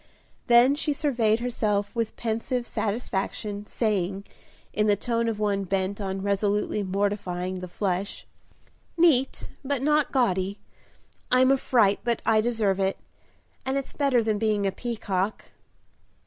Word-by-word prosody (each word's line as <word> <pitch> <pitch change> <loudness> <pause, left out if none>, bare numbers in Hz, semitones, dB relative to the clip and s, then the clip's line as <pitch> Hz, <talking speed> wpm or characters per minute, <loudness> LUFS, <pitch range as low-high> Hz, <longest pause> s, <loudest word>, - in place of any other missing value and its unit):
Then 240 +3 +6
she 295 0 0
surveyed 235 -7 +1
herself 215 -4 -1
with 230 -2 -2
pensive 235 +2 -2
satisfaction, 210 -1 -3
saying, 195 -3 -1 0.5
in 210 0 +1
the 205 - +4
tone 230 +3 -1
of 225 -2 -1
one 200 -2 0
bent 195 +2 -1
on 190 -1 -3
resolutely 205 +1 0
mortifying 185 -2 -2
the 180 - -6
flesh, 190 +1 -2 0.7
"Neat 300 -6 +3 0.2
but 275 -1 -2
not 300 0 +2
gaudy; 195 -6 +1 0.7
I'm 255 +1 +5
a - - +6
fright, 220 -6 +3
but 235 -1 0
I 220 -1 +4
deserve 215 -4 0
it, 195 0 0 0.7
and 265 +1 -1
it's 275 - -4
better 275 -5 +2
than 215 -2 0
being 210 -2 +1
a 195 - +1
peacock." 210 -3 -3
215 Hz, 135 wpm, -26 LUFS, 200-240 Hz, 0.7 s, Then